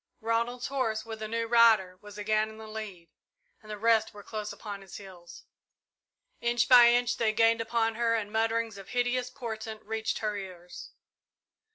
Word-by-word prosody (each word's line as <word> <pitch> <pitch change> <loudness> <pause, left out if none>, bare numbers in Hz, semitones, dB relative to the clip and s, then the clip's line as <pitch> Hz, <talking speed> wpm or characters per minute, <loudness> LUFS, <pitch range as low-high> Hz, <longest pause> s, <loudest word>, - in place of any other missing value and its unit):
Ronald's 235 +2 -1
horse, 230 -5 -2
with 220 -1 -8
a 215 - -3
new 230 +1 -2
rider, 225 -6 +4
was 205 -1 -12
again 215 +1 0
in 220 - -12
the 220 - -10
lead, 215 -6 -8 0.5
and 215 - -16
the 210 - -5
rest 220 0 +2
were 205 - -10
close 215 -1 -5
upon 205 -2 -8
his 195 -2 -10
heels. 185 -4 -13 1.0
Inch 235 0 +1
by 245 -2 +8
inch 245 0 +2
they 225 -2 +2
gained 230 +1 +3
upon 225 0 0
her 230 0 +1
and 210 -2 -3
mutterings 225 -1 0
of 195 - -11
hideous 245 0 0
portent 220 -4 -7
reached 220 +1 -2
her 210 -1 -2
ears. 180 -3 -9
220 Hz, 175 wpm, -29 LUFS, 210-230 Hz, 1.0 s, by